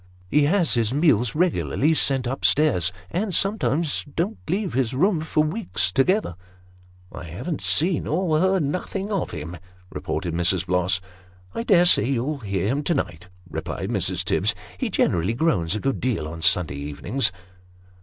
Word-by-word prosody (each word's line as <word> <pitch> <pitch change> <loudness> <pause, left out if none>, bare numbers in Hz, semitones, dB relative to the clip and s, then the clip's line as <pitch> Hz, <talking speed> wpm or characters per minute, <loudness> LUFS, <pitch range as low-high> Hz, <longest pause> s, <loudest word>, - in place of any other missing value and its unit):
He 150 -1 +4
has 175 +1 +2
his 120 0 +1
meals 130 -7 +2
regularly 160 -2 +1
sent 135 -4 +2
up 130 +3 -4
stairs, 120 - +3 0.2
and 190 -1 -1
sometimes 170 -7 0
don't 195 +7 -1
leave 190 +2 -1
his 130 -1 0
room 180 +4 +2
for 155 -1 +1
weeks 155 - -1
together." 160 - +1 0.4
" - - -28 0.3
I - - -8
haven't 100 - -5
seen 170 +2 +1
or 160 -1 +1
heard 190 -1 +2
nothing 190 +7 -3
of 195 -4 -1
him," 85 +2 -7 0.3
repeated 85 - -3
Mrs. 90 +2 +1
Bloss. 90 +1 +1 0.5
"I - - -3
dare 190 -7 +4
say 175 - +5
you'll 135 +3 -1
hear 100 -5 -2
him 140 +6 0
to 170 - +1
night," 90 - -4 0.2
replied 80 - -5
Mrs. - - 0
Tibbs; - - +1 0.2
"he - - -2
generally 90 +6 +1
groans 105 - +1
a - - -2
good 135 +2 -1
deal 115 -12 -1
on 80 +1 -7
Sunday 80 -4 +3
evenings." 95 - -1
135 Hz, 165 wpm, -23 LUFS, -, 0.5 s, say